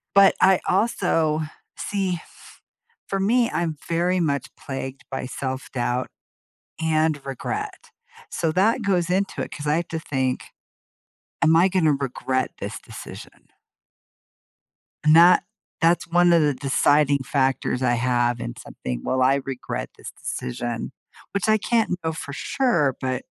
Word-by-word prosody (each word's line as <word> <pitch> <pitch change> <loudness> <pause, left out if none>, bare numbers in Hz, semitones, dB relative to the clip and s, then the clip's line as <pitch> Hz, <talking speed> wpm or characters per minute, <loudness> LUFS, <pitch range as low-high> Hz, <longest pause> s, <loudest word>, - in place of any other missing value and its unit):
but 195 -1 +7
I 190 -1 +6
also 175 -6 +1 0.3
see 195 -3 -1
f - - -18 0.5
for 195 - -1
me, 230 +5 +3
I'm 165 -3 -2
very 175 +2 +1
much 140 -5 0
plagued 135 -1 -6
by 135 - -3
self-doubt 130 -1 -3 0.7
and 155 -2 +1
regret. 135 -2 -5 0.4
So, 165 -2 -1
that 215 +8 +2
goes 180 -3 +1
into 195 +2 0
it, - - -5
'cause 145 - -7
I 150 - +3
have 170 - -2
to 165 - -3
think, 130 -5 -2 1.0
"Am 160 0 +5
I 180 +3 +5
gonna 170 -5 +3
regret 130 -1 -1
this - - -5
decision?" - - -11 1.6
And 155 +1 +6
that 175 +2 +7 0.4
that's 170 +2 +3
one 175 +1 +4
of 170 -2 +5
the 145 -2 +2
deciding 140 +2 +3
factors 130 -2 0
I 120 -1 +3
have 120 0 +1
in - - -4
something, - - -6
"Will 130 - 0
I 135 +2 +3
regret 135 -2 -4
this - - -8
decision," 120 - -4 0.4
which 200 +1 0
I 215 - +5
can't 220 -4 +1
know 160 0 -1
for 145 - -7
sure, 200 - +1
but 130 -1 -2
155 Hz, 140 wpm, -23 LUFS, 130-180 Hz, 1.6 s, but